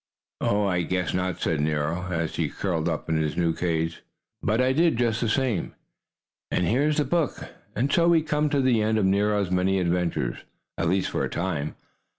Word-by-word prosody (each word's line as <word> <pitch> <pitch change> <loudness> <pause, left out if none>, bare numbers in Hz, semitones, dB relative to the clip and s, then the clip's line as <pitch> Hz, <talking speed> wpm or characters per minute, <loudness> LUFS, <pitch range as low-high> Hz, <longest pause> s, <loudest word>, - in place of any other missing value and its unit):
"Oh, 105 0 +2
I 90 -2 +1
guess 90 -2 -1
not," 90 0 -1
said 80 -3 0
Nero, 80 +4 -1
as 80 -2 -2
he - - 0
curled 85 -4 -1
up 80 - -3
in 80 -1 +1
his 75 0 -1
new 85 -2 +2
cage. 80 -1 -1 0.4
But 110 +3 +1
I 130 +1 +3
did, 165 -2 +3
just 115 -2 +1
the 115 - +1
same, 120 -7 0 0.7
and 90 - +1
here's 145 - +2
the 150 - +2
book. 170 -5 0 0.4
And 130 +7 0
so 170 -2 +4
we 165 -2 +4
come 150 -1 0
to 145 -2 +1
the 125 -4 +3
end 110 +1 +1
of 105 - +2
Nero's 100 0 +1
many 95 +1 +2
adventures 90 -1 0 0.4
at 85 - 0
least 95 +1 0
for - - -1
a - - -1
time. 85 -5 -2
95 Hz, 195 wpm, -25 LUFS, 85-125 Hz, 0.7 s, so